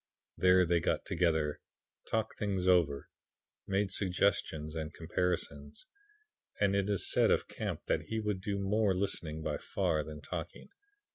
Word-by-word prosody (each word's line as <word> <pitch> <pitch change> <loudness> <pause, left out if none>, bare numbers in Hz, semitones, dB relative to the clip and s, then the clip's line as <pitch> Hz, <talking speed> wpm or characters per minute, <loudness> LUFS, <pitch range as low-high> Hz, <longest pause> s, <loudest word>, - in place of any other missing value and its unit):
There 90 0 +5
they 85 0 +3
got - - 0
together, 80 -4 +1 0.5
talked 110 -1 -1
things 95 -3 -1
over, 85 -6 +3 0.6
made 95 0 +1
suggestions 90 -5 0
and 80 -1 -4
comparisons. 80 -4 -2 0.7
And 100 -1 +3
it 100 0 +1
is 100 -2 +1
said - - +4
of - - +2
Camp - - -4
that - - 0
he 110 - -2
would 105 -3 -2
do 100 0 -2
more 100 0 +2
listening 85 -5 -2
by - - -2
far 85 -6 0
than 75 -1 -8
talking. 85 +3 -6
90 Hz, 145 wpm, -32 LUFS, 80-100 Hz, 0.7 s, There